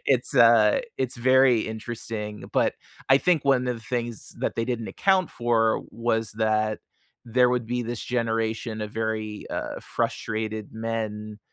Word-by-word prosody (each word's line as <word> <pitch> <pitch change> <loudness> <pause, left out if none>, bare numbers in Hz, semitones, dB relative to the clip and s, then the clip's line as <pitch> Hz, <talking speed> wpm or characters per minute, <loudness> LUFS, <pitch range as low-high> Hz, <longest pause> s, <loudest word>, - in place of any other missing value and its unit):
it's, 125 -3 +1
uh, 115 -2 +6 0.2
it's 130 -1 -2
very 130 -1 +5
interesting. 110 -1 -5
But - - +2 0.3
I 135 - +7
think 165 -2 +2
one 130 -2 +3
of 125 - 0
the 115 - -12
things 120 -1 -4
that - - -1
they 115 - -1
didn't 115 -2 -3
account 190 -2 +2
for 115 -2 +1
was 115 -2 -1
that 110 0 +1 0.5
there 125 +2 +3
would 125 -2 0
be 125 +1 -1
this 120 0 -4
generation 115 -2 -1
of 105 0 -6
very, 110 -1 -3
uh, - - -4
frustrated 110 -1 -3
men 110 -2 -4
115 Hz, 150 wpm, -25 LUFS, 110-125 Hz, 0.5 s, I